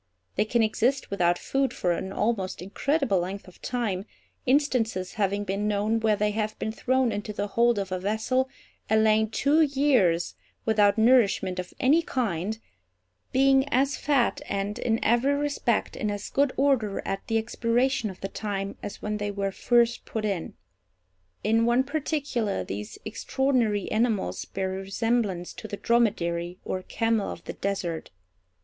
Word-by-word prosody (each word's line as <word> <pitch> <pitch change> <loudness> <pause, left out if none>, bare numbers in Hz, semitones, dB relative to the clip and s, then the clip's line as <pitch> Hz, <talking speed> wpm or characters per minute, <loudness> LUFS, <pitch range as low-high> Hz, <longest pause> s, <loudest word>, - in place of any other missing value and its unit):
They 210 - +2
can 230 +1 +2
exist 235 +5 0
without 175 -3 +2
food 270 0 -1
for 175 - 0
an 190 +2 -2
almost 200 -2 -1
incredible 235 - 0
length 190 +3 -4
of 185 - -16
time, 220 -6 -2 0.4
instances 245 -9 +1
having 200 -1 0
been 200 +1 -1
known 210 +2 +1
where 220 -1 +2
they 210 0 +1
have 215 0 -2
been 220 - -2
thrown 255 +1 +1
into 210 0 -4
the 205 0 -3
hold 235 +2 +3
of 195 -2 -3
a 185 - -1
vessel 220 +7 0 0.4
and 220 0 +4
lain 220 0 +3
two 285 +7 +3
years 265 - +3 0.3
without 210 -1 +4
nourishment 220 -6 +3
of 180 - -5
any 295 +6 +4
kind—being 205 - -1
as 270 +2 +2
fat, 280 -5 +1
and, 200 +2 -2
in 225 -2 +1
every 240 +5 +3
respect, 285 -5 0
in 215 - -2
as 205 0 -4
good 280 -1 +2
order 255 -7 +1
at 195 - -4
the 225 - +1
expiration 230 +1 0
of 185 - -11
the 195 - -2
time 200 -1 -4
as 205 - -7
when 210 0 -1
they 205 0 -2
were 200 -1 -2
first 235 +3 +2
put 220 -1 -3
in. 195 -6 -3 0.9
In 225 +2 +3
one 240 +2 +3
particular 280 - -1
these 105 +3 -6
extraordinary 230 -2 0
animals 215 - 0
bear 190 -1 -3
a - - -3
resemblance 195 -2 -1
to 220 - -8
the 205 - -5
dromedary, 180 -8 +1
or 185 - -2
camel 225 +1 0
of - - -9
the - - -6
desert. 185 -5 -3
215 Hz, 160 wpm, -26 LUFS, 195-245 Hz, 0.9 s, and